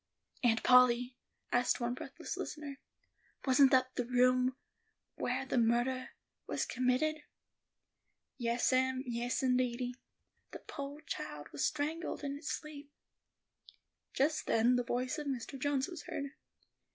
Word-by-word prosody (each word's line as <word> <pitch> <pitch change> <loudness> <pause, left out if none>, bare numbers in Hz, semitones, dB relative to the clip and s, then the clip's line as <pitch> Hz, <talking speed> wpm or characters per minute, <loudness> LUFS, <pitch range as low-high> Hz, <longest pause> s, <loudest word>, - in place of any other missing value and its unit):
"Aunt 225 -2 +3
Polly," 250 0 +5 0.4
asked 245 +1 +2
one 240 0 -1
breathless 270 +2 -6
listener, 290 -2 -6 0.7
"wasn't 270 0 +6
that 255 0 +3
the 250 - -1
room 255 +1 +3 0.6
whar 260 +2 -1
the 260 - -1
murdah 240 +3 +1 0.4
was - - -1
committed?" 255 +5 +1 1.2
"Yas, 235 +2 +1
em; 260 0 +2
yes 240 +1 -1
indeedy; 250 -1 +1 0.6
the - - -6
poor 280 +1 -6
child 150 - -6
was 145 - -3
strangled 305 +2 -2
in 280 -1 -2
its 285 +2 -5
sleep." 295 -2 -7 1.2
Just 305 +3 +1
then 235 +3 +4
the 245 - +1
voice 255 +5 -1
of 295 - -5
Mr. 270 0 -4
Jones 275 0 +1
was 350 - -7
heard. 280 -1 -4
255 Hz, 130 wpm, -34 LUFS, 245-280 Hz, 1.2 s, wasn't